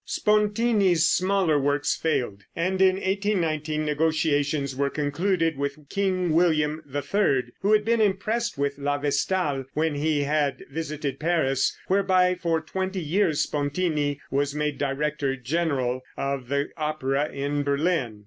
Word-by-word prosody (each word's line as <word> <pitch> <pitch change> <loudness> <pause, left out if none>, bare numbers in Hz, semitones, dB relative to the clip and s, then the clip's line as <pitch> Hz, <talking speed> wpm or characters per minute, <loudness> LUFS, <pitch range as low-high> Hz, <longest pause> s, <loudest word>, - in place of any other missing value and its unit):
Spontini's 210 -5 +2
smaller 185 -5 +2
works 145 +1 +1
failed, 130 -11 -1
and 185 +3 0
in 190 -1 +5
1819 170 -6 -1
negotiations 150 -2 0
were 140 +1 0
concluded 165 +2 0
with 140 +1 -4
King 185 -3 0
William 155 -2 +2
III, 145 0 +1 0.2
who 200 +2 +1
had 210 -1 +3
been 230 0 +2
impressed 215 +3 0
with 140 0 -1
"La 145 0 0
Vestale" 145 0 0
when 160 0 +1
he 145 0 0
had 145 -1 0
visited 150 -2 -4
Paris, 155 -5 +1
whereby 185 -1 +3
for 170 -2 0
twenty 190 +4 -3
years 165 -1 +1
Spontini 145 -1 -1
was 140 +1 0
made 150 -1 -2
"director 140 0 -1
general" 130 -2 -1 0.2
of 140 -2 -2
the 140 +1 0
opera 150 -2 -1
in 145 +1 -2
Berlin. 140 -5 0
155 Hz, 130 wpm, -25 LUFS, 140-185 Hz, 0.2 s, in